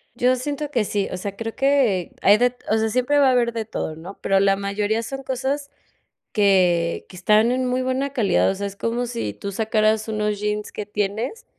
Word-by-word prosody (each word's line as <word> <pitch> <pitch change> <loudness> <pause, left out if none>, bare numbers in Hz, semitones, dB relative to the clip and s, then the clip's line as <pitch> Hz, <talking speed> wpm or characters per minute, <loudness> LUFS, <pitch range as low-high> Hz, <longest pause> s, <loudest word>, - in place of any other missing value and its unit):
Yo 250 +1 +3
siento 290 +3 -4
que 240 -6 +1
sí, 205 -1 -1
o 185 - -3
sea, 200 +2 -5
creo 225 +1 -5
que 270 -10 +2
hay 205 +2 +6
de 245 +1 +2 0.2
o 220 - +4
sea, 220 0 +1
siempre 255 +5 +2
va 275 -2 +5
a - - +4
haber 240 -2 +2
de 225 -1 -3
todo, 160 -7 -4
¿no? 175 +5 -10
Pero 195 0 +2
la 195 0 +4
mayoría 205 +3 -1
son 270 +3 -6
cosas 270 +2 -2 0.6
que 180 -5 +2
que - - -12
están 215 +5 +3
en 255 +1 0
muy 250 +1 0
buena 260 +2 -1
calidad, 210 -10 +2
o 195 - -1
sea, 200 +1 -3
es 200 - -9
como 235 +3 -1
si 235 - -4
tú 200 - -6
sacaras 215 +1 +1
unos 210 -1 -1
jeans 210 0 -2
que 210 - -5
tienes 210 - -3
220 Hz, 220 wpm, -22 LUFS, 200-255 Hz, 0.6 s, hay